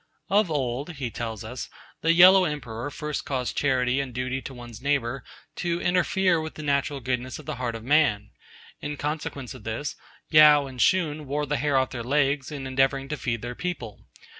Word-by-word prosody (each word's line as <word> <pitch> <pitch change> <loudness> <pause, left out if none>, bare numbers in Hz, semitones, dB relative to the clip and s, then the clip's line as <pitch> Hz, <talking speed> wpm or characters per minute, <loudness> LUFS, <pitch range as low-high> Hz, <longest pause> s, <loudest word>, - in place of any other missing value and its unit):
'Of 205 -2 +4
old,' 140 +2 -2
he 130 -6 -4
tells 115 -2 -5
us, 120 +3 -6 0.3
'the 165 +1 +4
Yellow 185 +2 +8
Emperor 125 -5 -4
first 150 0 -4
caused 130 -3 -2
charity 130 -2 +1
and 135 -2 -5
duty 130 +1 -2
to - - -7
one's 120 -3 -10
neighbour 135 -2 0 0.3
to 175 -1 -1
interfere 180 -1 +2
with 160 0 -6
the 155 - -7
natural 140 -1 0
goodness 125 +1 -2
of 155 - -12
the - - -4
heart 120 -2 -2
of 115 - -7
man. 125 -7 +2 0.5
In 145 0 -4
consequence 145 -3 -4
of 130 -5 -12
this, 115 +7 -4 0.4
Yao 150 -2 +8
and 130 -2 -6
Shun 155 -5 +2
wore 145 +2 -1
the 145 +1 -1
hair 140 +2 +1
off 130 -1 +1
their 120 - -4
legs 140 +2 +1
in 140 -3 -5
endeavouring 135 +1 +1
to 150 - -1
feed 120 -3 -3
their 120 +1 -4
people. 125 - -6
135 Hz, 190 wpm, -26 LUFS, 125-150 Hz, 0.5 s, Yellow